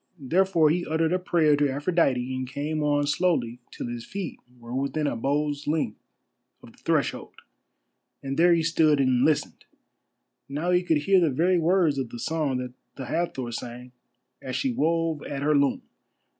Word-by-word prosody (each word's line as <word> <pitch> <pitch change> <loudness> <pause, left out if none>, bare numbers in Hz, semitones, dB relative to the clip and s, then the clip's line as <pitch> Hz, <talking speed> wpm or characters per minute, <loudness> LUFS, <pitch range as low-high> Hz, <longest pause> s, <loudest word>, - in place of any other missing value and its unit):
Therefore 165 +2 +2
he 175 +2 0
uttered 160 +1 0
a 185 - +1
prayer 160 -4 +3
to 145 0 +1
Aphrodite 135 -4 0
and 130 0 -4
came 150 +3 -3
on 145 -1 +1
slowly 145 -7 0
till - - -7
his 120 -1 -5
feet 195 +1 -6 0.2
were 120 0 -10
within 140 +3 -1
a 145 - -1
bow's 145 +4 -1
length 150 -8 -1 0.6
of - - -13
the - - -24
threshold, - - -1 0.9
and 135 0 -3
there 175 +3 +5
he 165 -1 +3
stood 155 -2 +3
and 130 -2 +3
listened. 155 -2 0 0.9
Now 155 +6 -1
he 180 0 +4
could 160 -5 +1
hear 195 +3 +4
the 170 -3 +3
very 175 +6 +2
words 165 -4 +2
of 130 -3 -3
the 120 - -8
song 150 0 -1
that 125 -1 -5 0.2
the 135 - -6
Hathor 130 -4 -2
sang 120 +2 -7 0.5
as 130 - -5
she 265 - 0
wove 165 -4 0
at 140 -1 -5
her 150 +1 +3
loom. 140 -1 +1
150 Hz, 175 wpm, -26 LUFS, 130-165 Hz, 0.9 s, there